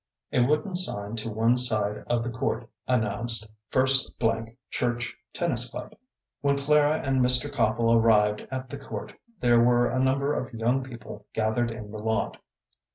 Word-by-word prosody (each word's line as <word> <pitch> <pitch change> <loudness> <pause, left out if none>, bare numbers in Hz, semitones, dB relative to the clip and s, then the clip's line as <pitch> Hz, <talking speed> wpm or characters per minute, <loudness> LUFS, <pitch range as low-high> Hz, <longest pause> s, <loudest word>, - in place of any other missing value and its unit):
A - - +3
wooden 150 +9 +1
sign 110 - +1
to 115 +1 -2
one 115 +3 +2
side 110 -4 +1
of 120 -1 +1
the 120 - -3
court 120 -1 -2 0.2
announced, 115 -1 0 0.2
"First 130 +1 +3 0.6
Church 120 -1 -1 0.2
Tennis 125 -8 -1
Club." - - -8 0.5
When 140 0 +2
Clara 150 +2 +3
and 135 -1 +2
Mr. 125 +3 +2
Copple 115 -2 +2
arrived 105 -2 +3
at 130 0 -5
the 140 - -6
court 140 - -7 0.3
there 120 -1 +5
were 120 0 +4
a 130 - 0
number 135 +2 +2
of 125 -4 -4
young 120 +4 +1
people 115 -4 -10
gathered 110 +2 0
in 110 -2 -8
the 110 - -6
lot. 110 +1 -1
120 Hz, 160 wpm, -27 LUFS, 110-130 Hz, 0.6 s, there